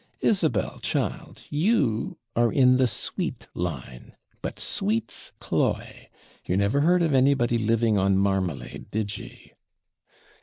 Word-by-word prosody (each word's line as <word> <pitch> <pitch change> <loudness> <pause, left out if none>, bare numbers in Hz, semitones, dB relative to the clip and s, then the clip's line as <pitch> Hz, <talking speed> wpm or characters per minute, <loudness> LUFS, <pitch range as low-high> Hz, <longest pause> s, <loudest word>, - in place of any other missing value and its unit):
Isabel, - - +1
child, - - -3
you 145 - +1 0.2
are 120 0 +3
in 125 -2 +5
the 130 -1 +4
sweet 110 - -3
line 70 -8 -5 0.3
but - - -5
sweets 110 +3 -2
cloy. - - -2 0.3
You 90 - -1
never 100 +7 +2
heard 175 +3 +4
of 160 -3 +1
anybody 130 -3 +3
living 115 -1 +2
on 95 0 +3
marmalade, 95 -5 -1
did 105 -1 -2
ye?' - - -13
115 Hz, 120 wpm, -26 LUFS, 100-130 Hz, 0.3 s, in